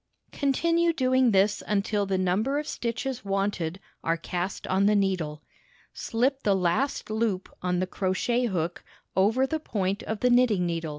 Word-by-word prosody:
Continue 335 +4 +2
doing 255 -3 +3
this 200 0 +3
until 205 0 0
the 190 -1 0
number 195 +10 +1
of 300 - -2
stitches 240 +1 -3
wanted 195 -3 -1 0.2
are 165 0 +1
cast 180 +3 -4
on 190 +2 +2
the 210 - +4
needle. 180 -7 -1 0.5
Slip 265 +4 0
the 200 -5 +2
last 190 +8 0
loop 215 -4 -1
on 180 0 0
the 185 - +1
crochet 200 +7 0
hook 175 -4 -2 0.3
over 220 +8 +3
the 315 +4 -2
point 200 -7 -2
of 220 -1 -4
the 250 - +3
knitting 240 -7 +4
needle. 165 -2 -2
205 Hz, 160 wpm, -27 LUFS, 185-250 Hz, 0.5 s, the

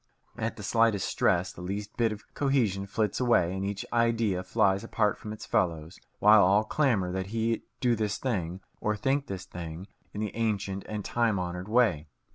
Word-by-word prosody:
At 115 0 -3
the 105 - -9
slightest 115 -2 +2
stress, 90 +1 +1
the - - -10
last 90 - -6
least 100 +1 -4
bit 115 -2 +2
of 100 -1 -9
cohesion 115 -9 +1
flits 105 0 -1
away, 115 -8 +3
and 95 - -3
each 100 0 -3
idea 115 -5 +2
flies 95 +2 +1
apart 105 -2 +1
from 105 - -8
its 110 - -7
fellows, 80 -3 -1 0.2
while 105 0 +7
all 100 +3 +4
clamour 110 -7 +1
that 95 0 -3
he 115 +2 -1 0.2
do 120 -2 +3
this 105 -2 -1
thing, 95 -8 -2 0.2
or 105 0 0
think 135 +6 0
this 95 -1 -5
thing, 85 +1 -7 0.3
in 105 - -6
the 105 -2 -3
ancient 100 -4 -1
and 105 -2 -4
time 115 -4 +1
honoured 90 +2 -4
way. 110 -10 +2
105 Hz, 190 wpm, -28 LUFS, 95-115 Hz, 0.3 s, while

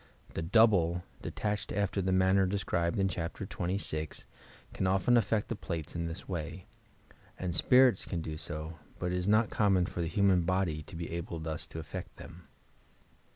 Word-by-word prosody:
The - - -2
"double," 90 -2 +4 0.2
de - - -4
tached 105 -1 -2
after 100 0 0
the 95 0 0
manner 95 +1 +4
described 90 -3 0
in 95 -1 +3
Chapter 90 +2 -4
XXVI, 85 -5 -3 0.5
can 95 - 0
often 95 +6 +3
aJTect 110 -2 +3
the 115 - -3
plates 85 -6 -5
in 85 -1 -2
this 85 +4 -7
way, 85 0 -5 0.7
and 90 -2 -3
spirits 125 +4 +5
can 85 - -3
do 80 - -5
80, 75 0 -5 0.3
but 90 0 -2
it 90 - 0
is 90 - -3
not 110 +1 +4
common 95 -4 +3
for 85 - -4
the 85 - -1
human 95 +1 +3
body 85 -3 0
to 100 - -10
be 85 0 -5
able 85 0 -4
thoa 80 -1 -4
to - - -8
aSect 80 -2 -7
them. 85 -2 -12
90 Hz, 180 wpm, -31 LUFS, 85-100 Hz, 0.7 s, spirits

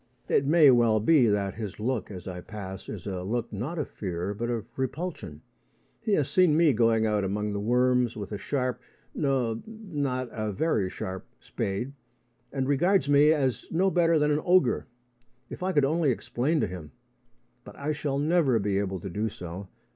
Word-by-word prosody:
It 135 - +2
may 155 -2 +7
well 115 -3 +4
be 130 +2 +4
that 100 -2 0
his 105 -3 -6
look 120 +1 -2
as 90 -3 -8
I 90 -1 -5
pass 95 -2 -8
is 100 -5 -7
a 95 -3 -3
look 115 +4 -3
not 130 - -4
of 150 - -2
fear 90 0 -4
but 120 +4 -3
of 115 -4 -2
repulsion. 130 - -4 0.6
He 220 -2 0
has 145 -7 +2
seen 155 +1 +4
me 165 -4 +5
going 115 -1 +3
out 105 -2 +1
among 105 +2 -2
the 100 - -2
worms 125 +2 +2
with 105 -1 -6
a 105 - -3
sharp 125 +2 -2 0.3
no, 130 -6 0
not 145 - -3
a 110 -1 -3
very 100 - 0
sharp 95 0 -6
spade, 100 +8 -4 0.6
and 135 -2 -2
regards 175 +4 +2
me 145 +2 +6
as 135 -5 0
no 190 +4 +2
better 170 -2 +3
than 150 0 +2
an 150 +1 +1
ogre. 175 -12 +3 0.6
If - - -7
I 185 +1 0
could 145 -6 +3
only 155 +1 +2
explain 130 +5 0
to - - +2
him! 90 -5 -9 0.7
But - - -12
I 145 +2 -2
shall 150 -2 -2
never 150 -4 +3
be 100 -2 0
able 95 -2 -2
to - - -6
do 105 +5 -1
so. 90 0 -8
125 Hz, 185 wpm, -27 LUFS, 105-150 Hz, 0.7 s, may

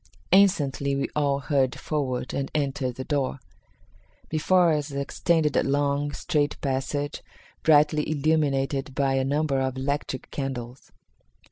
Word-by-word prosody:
Instantly 145 -8 +3
we 140 - -1
all 140 -2 +1
hurried 135 -3 +1
forward 130 -5 -2
and 135 0 -2
entered 135 -4 -1
the 130 - -5
door. 140 -1 -1 0.9
Before 170 +2 +3
us 150 -1 -1
extended 150 +2 0
a - - +4
long, 145 +1 0
straight 150 -2 -1
passage, 140 +2 -2 0.4
brightly 150 -1 +4
illuminated 140 -3 0
by 140 -2 +1
a 135 0 +1
number 140 0 0
of 130 -1 -1
electric 135 -1 -3
candles. 130 -3 -5
140 Hz, 125 wpm, -25 LUFS, 135-150 Hz, 0.9 s, a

